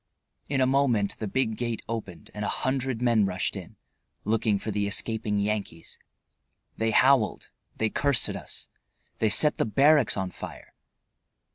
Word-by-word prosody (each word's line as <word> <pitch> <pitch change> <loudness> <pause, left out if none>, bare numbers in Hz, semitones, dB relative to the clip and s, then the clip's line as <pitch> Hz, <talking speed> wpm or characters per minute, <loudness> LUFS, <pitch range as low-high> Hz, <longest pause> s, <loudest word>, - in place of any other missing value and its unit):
In 135 -1 +1
a - - +5
moment 130 -6 +1
the 110 - -3
big 110 0 -1
gate 120 -2 -3
opened 100 -8 -6
and 105 - -5
a - - -1
hundred 130 -2 -2
men 115 -5 +3
rushed 90 -1 -2
in, - - -9 0.5
looking 110 -1 +1
for 110 +2 -5
the 100 0 -1
escaping 105 0 0
Yankees. 100 -5 -3 0.8
They 115 0 0
howled, 130 -1 +3 0.3
they 110 -1 0
cursed 140 -3 +2
at - - -4
us, - - -7 0.5
they 110 - +2
set 150 +8 +4
the - - +2
barracks 140 +3 +4
on 95 -1 -2
fire. - - -10
110 Hz, 155 wpm, -26 LUFS, 105-130 Hz, 0.8 s, a